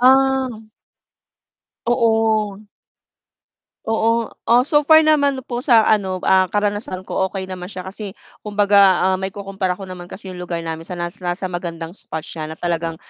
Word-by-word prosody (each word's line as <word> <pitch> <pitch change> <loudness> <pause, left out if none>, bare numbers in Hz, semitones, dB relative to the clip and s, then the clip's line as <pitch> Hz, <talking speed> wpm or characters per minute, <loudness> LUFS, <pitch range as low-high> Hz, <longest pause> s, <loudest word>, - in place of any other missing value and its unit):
Ah. 265 +1 +4 1.4
Oo. 220 -4 +2 1.3
Oo. 225 +1 +1 0.2
O, 240 +2 +6
so 295 +1 +3
far 315 0 +7
naman 285 -3 +3
po 240 -1 -4
sa 235 -4 +5
ano, 195 -4 +1
ah, 190 -1 +4
karanasan 205 -1 -2
ko 190 - -1
okey 190 0 -5
naman 180 -1 -6
siya 185 -2 -7
kasi 195 0 -7 0.3
kumbaga, 205 -1 +2 0.3
ah, - - +2
maikukumpara 195 -1 -3
ko 195 - -8
naman 180 -1 -8
kasi 190 -1 -8
yung 180 - -8
lugar 175 -1 -3
namin 160 0 -4
sa 180 - -6
nasa 175 0 -4
nasa 180 +2 -2
magandang 170 -2 -5
spot 160 -5 -6
siya 155 -2 -6
na 160 - -7
talagang 165 -1 -2
200 Hz, 155 wpm, -20 LUFS, 180-230 Hz, 1.4 s, far